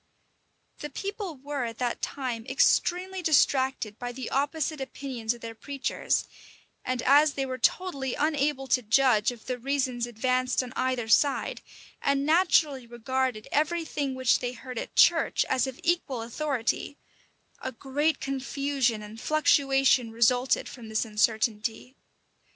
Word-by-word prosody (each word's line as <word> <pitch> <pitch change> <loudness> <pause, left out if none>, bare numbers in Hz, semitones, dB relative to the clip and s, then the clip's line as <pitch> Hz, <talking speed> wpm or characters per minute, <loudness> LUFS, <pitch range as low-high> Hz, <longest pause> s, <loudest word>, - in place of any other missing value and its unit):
The 295 - -5
people 390 +1 -5
were 280 0 -4
at 230 -1 -6
that 245 -1 -2
time 250 -5 -3
extremely 370 +5 +2
distracted 265 -8 +2
by 245 0 -4
the 255 0 -6
opposite 290 +2 -1
opinions 255 -4 -4
of 235 - -16
their 230 0 -6
preachers; 275 +3 -2 0.6
and 255 -1 -2
as 290 +2 +5
they 275 - -2
were 255 -1 -5
totally 275 -2 0
unable 290 -2 0
to 250 - +3
judge 230 -1 +3
of 235 -3 -12
the 250 -1 -3
reasons 255 -2 -1
advanced 255 +2 0
on 250 0 -9
either 255 -3 -1
side, 280 +5 +2 0.4
and 280 0 +1
naturally 310 -6 +3
regarded 240 -1 -2
every 325 +3 +1
thing 280 -4 -3
which 260 -2 +3
they 245 0 -3
heard 250 0 -7
at - - -7
church - - +4
as 260 0 +1
of 260 -1 -7
equal 315 -8 0
authority, 270 +2 -2 0.6
a 260 - -4
great 285 +6 -1
confusion 270 -4 -1
and 215 +2 -10
fluctuation 270 -5 +3
resulted 245 +3 +2
from 235 -3 -10
this 220 +2 0
uncertainty. 220 +3 -1
260 Hz, 140 wpm, -27 LUFS, 240-285 Hz, 0.6 s, as